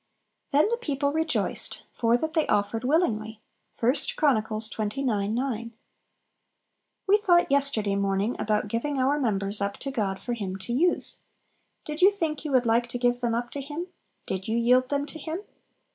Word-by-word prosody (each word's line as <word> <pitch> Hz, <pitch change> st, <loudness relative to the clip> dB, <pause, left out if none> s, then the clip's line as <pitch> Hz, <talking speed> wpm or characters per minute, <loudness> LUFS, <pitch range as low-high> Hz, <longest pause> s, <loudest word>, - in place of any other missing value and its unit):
"Then 295 Hz, +4 st, +4 dB
the 470 Hz, -, 0 dB
people 285 Hz, -, -1 dB
rejoiced, 320 Hz, +1 st, -1 dB
for 235 Hz, 0 st, +2 dB
that 315 Hz, +5 st, -3 dB
they 315 Hz, -2 st, +2 dB
offered 205 Hz, +3 st, 0 dB
willingly." 225 Hz, -7 st, +1 dB, 0.4 s
I 245 Hz, +3 st, +5 dB, 0.2 s
Chron. 280 Hz, -8 st, +3 dB
xxix. 220 Hz, +3 st, -3 dB, 0.3 s
9 235 Hz, -3 st, -2 dB, 1.3 s
We 400 Hz, +1 st, +5 dB
thought 350 Hz, -5 st, +3 dB
yesterday 270 Hz, -8 st, +2 dB
morning 200 Hz, +3 st, 0 dB
about 210 Hz, 0 st, 0 dB
giving 255 Hz, +7 st, -2 dB
our 270 Hz, +3 st, +2 dB
members 205 Hz, -5 st, 0 dB
up 200 Hz, 0 st, -1 dB
to 275 Hz, -, -5 dB
God 200 Hz, -7 st, -1 dB
for 240 Hz, -, -4 dB
Him 200 Hz, -5 st, -4 dB
to 195 Hz, +5 st, -5 dB
use. 345 Hz, +8 st, +1 dB, 0.7 s
Did 300 Hz, +2 st, -5 dB
you 380 Hz, -, +8 dB
think 325 Hz, -8 st, -2 dB
you 300 Hz, -, -4 dB
would 255 Hz, -2 st, +3 dB
like 235 Hz, +1 st, +2 dB
to 245 Hz, -, -3 dB
give 245 Hz, 0 st, +1 dB
them 240 Hz, -2 st, 0 dB
up 240 Hz, +1 st, -3 dB
to 280 Hz, -, -4 dB
Him? 305 Hz, +6 st, -6 dB, 0.4 s
did 190 Hz, 0 st, -4 dB
you 225 Hz, +1 st, 0 dB
yield 250 Hz, +2 st, +3 dB
them 285 Hz, 0 st, 0 dB
to 310 Hz, +2 st, -9 dB
Him? 325 Hz, +4 st, -4 dB
245 Hz, 175 wpm, -26 LUFS, 220-295 Hz, 1.3 s, you